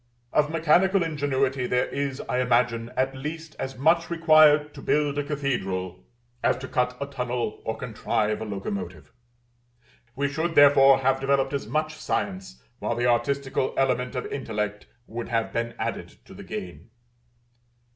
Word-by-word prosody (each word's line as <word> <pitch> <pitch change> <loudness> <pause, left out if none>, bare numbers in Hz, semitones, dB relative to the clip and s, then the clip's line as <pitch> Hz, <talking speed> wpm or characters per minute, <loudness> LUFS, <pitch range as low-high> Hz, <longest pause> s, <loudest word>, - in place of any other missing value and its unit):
Of 150 0 +3
mechanical 175 +4 +3
ingenuity, 140 -4 0
there 125 0 +1
is, 140 -1 -3
I 125 - -2
imagine, 120 -1 +1
at 135 +1 0
least 155 +4 -6
as 135 -1 -4
much 165 +5 +3
required 155 -3 +5
to - - -10
build 145 -1 +1
a - - 0
cathedral 95 - -3 0.4
as - - +2
to 130 - -7
cut 125 -1 0
a 140 - -2
tunnel 125 -5 -3
or 110 0 -2
contrive 110 -2 -1
a - - -3
locomotive: 95 -6 -6 1.0
we 140 +1 0
should, 160 +4 -2
therefore, 140 -1 +7
have 135 0 +2
developed 135 0 +1
as 140 -6 -3
much 155 +5 -1
science, 95 - -4 0.2
while - - -2
the 120 - 0
artistical 130 +2 0
element 130 -1 0
of 125 - -3
intellect 105 -6 -4 0.2
would 115 0 -6
have 115 -2 -1
been 115 0 -2
added - - -4
to - - -13
the - - -10
gain. 90 +1 -7
130 Hz, 155 wpm, -25 LUFS, 115-145 Hz, 1.0 s, therefore